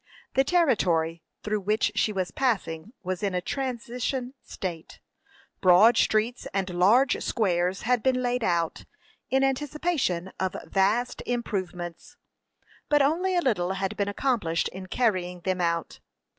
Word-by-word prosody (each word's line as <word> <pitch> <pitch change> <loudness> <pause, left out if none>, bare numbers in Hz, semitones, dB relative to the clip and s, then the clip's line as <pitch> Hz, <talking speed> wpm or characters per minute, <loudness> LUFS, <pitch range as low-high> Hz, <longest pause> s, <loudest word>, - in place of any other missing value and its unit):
The 270 - +4
territory 180 - +2 0.2
through 210 0 -1
which 210 +3 +1
she 215 - +1
was 185 -3 -2
passing 195 -8 -1
was 185 -1 -3
in 200 -3 -1
a - - +2
transition 250 +2 -3
state: 170 -4 -7 0.6
broad 185 +5 +7
streets 220 +3 +1
and 195 -1 0
large 215 +10 +4
squares 185 -4 0
had 245 0 +2
been 255 +1 +1
laid 245 -1 0
out, 170 -4 0 0.4
in 265 +1 +2
anticipation 270 - -1
of 190 -1 -1
vast 205 +6 +1
improvements, 185 -8 -4 0.7
but 295 -1 +4
only 355 +6 +1
a 350 - +3
little 190 - 0
had 195 0 -2
been 200 - -1
accomplished 205 -8 0
in 185 0 -9
carrying 185 -6 0
them 185 0 -1
out. 170 -1 -1
210 Hz, 135 wpm, -26 LUFS, 180-250 Hz, 0.7 s, broad